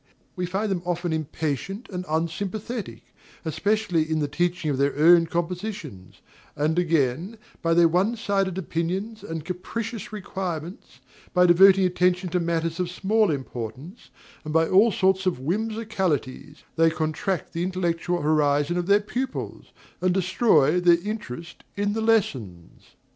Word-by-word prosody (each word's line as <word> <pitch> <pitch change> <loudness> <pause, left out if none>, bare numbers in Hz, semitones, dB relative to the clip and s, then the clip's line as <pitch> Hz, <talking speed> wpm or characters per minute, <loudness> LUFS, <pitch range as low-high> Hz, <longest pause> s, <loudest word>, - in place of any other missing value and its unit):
We 180 -2 -2
find 195 +3 -1
them 180 -3 -1
often 175 -1 -2
impatient 160 - -3
and 180 -1 -5
unsympathetic, 195 +8 -3 0.4
especially 180 -1 0
in 160 - 0
the 150 -1 0
teaching 175 +1 -1
of 135 - -2
their 140 +1 +1
own 165 +2 +6
compositions; 170 - -5 0.3
and 155 +4 +1
again, 165 - 0 0.2
by 165 0 +2
their 170 0 +6
one 185 +8 +1
sided 195 -4 -1
opinions 190 +5 -3
and 165 -2 -6
capricious 210 +5 -5
requirements, 180 - -6 0.3
by 180 0 +6
devoting 190 +2 +6
attention 180 0 +1
to 180 +1 0
matters 165 0 -1
of 180 -1 -1
small 210 +3 +1
importance, 135 - -6 0.3
and 155 - -5
by 160 0 +4
all 205 +5 +5
sorts 190 0 +1
of 180 - +1
whimsicalities, 185 - -2
they 165 0 +5
contract 160 +3 -2
the 170 - -2
intellectual 175 -2 -1
horizon 150 +1 +2
of 175 0 -2
their 200 +1 +5
pupils, 255 +5 -5 0.3
and 180 0 +2
destroy 180 - +3
their 175 -1 +5
interest 175 - -6
in 205 0 0
the 225 - -2
lessons. 130 - 0
MRS. - - -25
SOLID. - - -27
175 Hz, 145 wpm, -25 LUFS, 160-195 Hz, 0.4 s, own